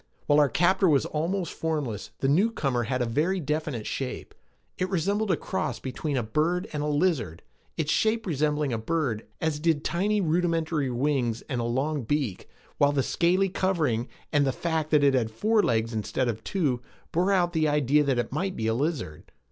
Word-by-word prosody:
While 145 0 +4
our 145 -2 +4
captor 185 +4 +3
was 140 -3 +3
almost 170 +3 -2
formless, 145 -10 -3
the 135 - +2
newcomer 140 - +1
had 125 +1 0
a - - 0
very 155 +11 0
definite 150 -7 -2
shape. 130 -2 -4 0.5
It 185 - 0
resembled 200 +4 0
a 175 - +2
cross 190 -1 -3
between 135 +2 -3
a 125 - 0
bird 165 - 0
and 150 - -2
a 150 - -1
lizard, 145 - 0 0.3
its 155 -2 0
shape 220 0 +1
resembling 150 -4 0
a 115 - -1
bird, 125 -4 -2
as 160 -2 -1
did 155 -2 +1
tiny 205 +5 +1
rudimentary 165 -4 0
wings 125 -2 0
and 125 -4 -3
a - - -2
long 135 +5 -1
beak, 125 -5 -2 0.3
while 145 0 +5
the 140 -2 +1
scaly 180 +7 +2
covering 155 -12 0 0.3
and 145 -1 +4
the 135 - +2
fact 160 +2 -2
that 150 -2 +4
it 140 -1 +5
had 120 -4 +1
four 215 - +2
legs 115 - 0
instead 110 +4 -1
of 110 -2 -3
two 145 -11 0 0.3
bore 180 +4 +2
out 175 -3 +2
the 160 -2 +2
idea 150 0 +3
that 135 -3 +1
it 120 - -1
might 185 +6 -1
be 110 - -3
a 110 - +2
lizard. 135 - -3
150 Hz, 190 wpm, -27 LUFS, 125-170 Hz, 0.5 s, while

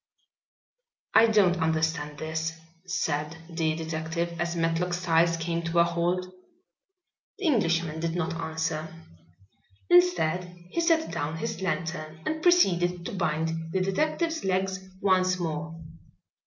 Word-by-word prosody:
"I 230 - +7
don't 200 -5 +4
understand 160 -2 0
this," 160 +1 -3 0.3
said 160 -3 -1
the 160 -1 0
detective, 160 +1 -3
as 170 0 -1
Matlock 165 +1 0
Styles 170 -1 +2
came 165 +1 -2
to 165 +1 -2
a 170 - +7
halt. 170 +2 0 1.1
The 400 - -5
Englishman 170 - +1
did 165 0 -2
not 170 -2 -1
answer. 160 -1 -2 1.0
Instead, 175 0 +3
he 335 - 0
set 330 -1 +2
down 150 +3 -3
his 160 - -4
lantern 160 -4 -3
and 315 0 -2
proceeded 180 - +3
to - - -4
bind 160 -2 -1
the 190 - +2
detective's 310 - 0
legs 190 0 0 0.2
once 185 -1 +3
more. 165 -1 -4
170 Hz, 125 wpm, -27 LUFS, 160-185 Hz, 1.1 s, I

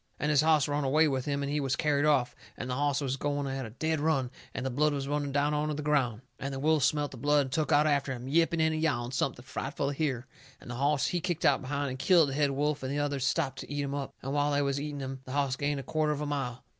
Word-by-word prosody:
And 150 - +1
his 145 -1 +5
hoss 155 -2 +4
run 145 0 -1
away 155 +4 +4
with 130 -3 -1
him 140 -1 -1
and 140 - -2
he 150 - 0
was 135 -2 0
carried 150 -2 +1
off, 130 -5 +3 0.2
and 125 - -5
the 125 - -2
hoss 145 +2 +1
was 135 -1 -1
going 145 0 -1
at 135 -2 -3
a - - -9
dead 160 +7 -1
run, 140 -5 +1 0.2
and 130 - -4
the 130 - -1
blood 150 +4 +2
was 140 -1 -3
running 145 -1 -1
down 145 +1 +1
onto 150 0 0
the 150 - -4
ground. 130 -7 +1 0.2
And 140 - -3
the 135 - -4
wolves 155 -1 +3
smelt 145 -2 -1
the - - -9
blood 145 +4 +3
and 130 -2 -4
took 150 +1 0
out 145 +1 +5
after 140 -3 +1
him, 125 0 -6
yipping 165 +3 +2
and 160 0 +1
yowling 125 -6 0
something 125 -1 -2
frightful 140 +1 -3
to - - -2
hear, 135 -5 -1 0.3
and 120 - -9
the - - -4
hoss 140 +2 +1
he 175 - -1
kicked 175 -1 -2
out - - +4
behind 140 +1 -2
and 130 - -6
killed 170 -2 +5
the - - -4
head 145 0 +2
wolf 145 +2 0
and 130 0 -3
the 145 - -1
others 145 -2 -1
stopped 135 0 0
to - - -8
eat 145 0 -1
him 140 0 -3
up, 140 -2 -4
and 135 +1 -3
while 145 0 +2
they 145 0 +2
was 140 0 -1
eating 145 -1 -4
him 135 0 -5
the 130 - -7
hoss 140 -2 +1
gained 145 +1 -1
a - - -6
quarter 155 +1 0
of 150 0 -2
a - - -1
mile. 135 -4 -3
145 Hz, 295 wpm, -30 LUFS, 135-150 Hz, 0.3 s, his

